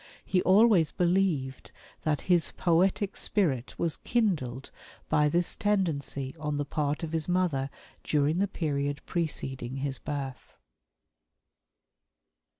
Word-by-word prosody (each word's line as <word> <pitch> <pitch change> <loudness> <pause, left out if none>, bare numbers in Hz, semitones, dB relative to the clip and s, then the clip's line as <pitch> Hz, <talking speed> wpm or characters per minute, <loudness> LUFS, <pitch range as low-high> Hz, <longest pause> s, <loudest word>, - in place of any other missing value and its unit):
He 185 - +2
always 190 -4 +5
believed 170 -7 0 0.3
that 150 -3 +1
his 175 -3 +2
poetic 190 +3 +2
spirit 140 - 0
was 165 -3 -1
kindled 150 - -1 0.4
by 150 0 +3
this 170 +3 +1
tendency 160 -10 -1
on 150 -1 -2
the 145 - -1
part 145 +2 -2
of 160 - -3
his 160 -2 -2
mother 170 -7 +1 0.3
during 150 +3 +1
the 200 - +2
period 145 -5 -2
preceding 135 -7 -3
his 135 -1 -2
birth. 140 -3 -6
155 Hz, 115 wpm, -29 LUFS, 140-180 Hz, 0.4 s, always